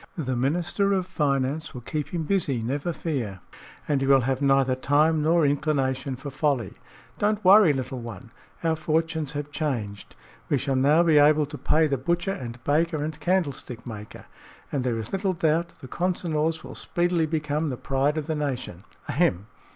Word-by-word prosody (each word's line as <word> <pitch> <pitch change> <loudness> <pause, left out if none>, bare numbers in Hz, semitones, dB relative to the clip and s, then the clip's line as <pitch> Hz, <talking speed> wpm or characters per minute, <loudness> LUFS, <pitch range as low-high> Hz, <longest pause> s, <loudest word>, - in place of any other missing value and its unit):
The 130 -6 -2
Minister 175 +10 +1
of 190 -2 0
Finance 145 -5 -1
will 125 - -6
keep 150 +5 -3
him 170 -2 -2
busy, 150 - 0
never 140 +8 -2
fear, 130 - -3 0.5
and 145 -3 +1
he 135 - 0
will 135 -1 +6
have 130 +2 -1
neither 135 -2 +3
time 150 +4 +2
nor 165 +1 +3
inclination 135 -2 0
for 135 +3 -8
folly. 135 - 0 0.5
Don't 210 -1 0
worry, 195 -3 +8
little 130 -2 -3
one. 115 -2 -9 0.3
Our 165 -1 +2
fortunes 160 -1 -1
have 145 0 -5
changed; 120 -10 -4 0.3
we 145 - +3
shall 135 0 -1
now 145 +6 +4
be 160 -3 +5
able 150 +1 +5
to 145 - -9
pay 160 +1 +2
the 140 -4 0
butcher 175 +7 0
and 120 -6 -7
baker 155 +1 +1
and 155 0 -5
candlestick 145 -8 -1
maker, 105 -3 -9 0.5
and 135 -3 -1
there 120 -2 0
is 110 0 -5
little 195 0 0
doubt 165 0 0
the 130 - -8
Consinors 160 -1 -1
will - - -9
speedily 175 -2 0
become 150 0 -1
the 130 - -4
pride 140 +4 0
of 155 - -2
the 160 - -2
nation. 130 - -4 0.2
Ahem! 135 - +1
150 Hz, 175 wpm, -25 LUFS, 130-160 Hz, 0.5 s, worry